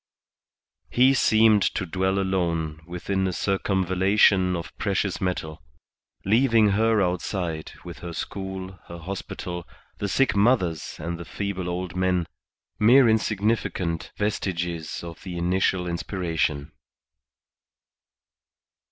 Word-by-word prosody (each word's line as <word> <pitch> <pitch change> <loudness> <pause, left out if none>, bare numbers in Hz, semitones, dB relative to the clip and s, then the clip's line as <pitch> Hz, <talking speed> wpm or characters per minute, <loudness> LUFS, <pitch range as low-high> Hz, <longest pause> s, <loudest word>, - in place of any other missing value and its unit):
He 130 +2 +5
seemed 110 -4 +5
to 95 - 0
dwell 95 +2 0
alone 85 -5 -1
within 95 +2 -2
a - - -1
circumvallation 95 0 +2
of 85 -1 -6
precious 100 -2 -1
metal, 80 -4 -3 0.6
leaving 115 0 +4
her 110 +1 +3
outside 90 -2 -2
with - - -8
her 85 - -6
school, 95 +1 -6
her 85 - -8
hospital, 90 0 -6 0.4
the 100 - -2
sick 135 +4 +2
mothers 100 - +1
and 85 +2 -5
the 85 - -7
feeble 95 -1 -4
old 90 +1 -4
men, 90 -1 +1 0.5
mere 125 +4 +6
insignificant 105 -6 0
vestiges 85 -6 -2
of 85 -1 -9
the 90 -2 -6
initial 90 +1 +1
inspiration. 85 -4 -2
95 Hz, 110 wpm, -25 LUFS, 85-100 Hz, 0.6 s, mere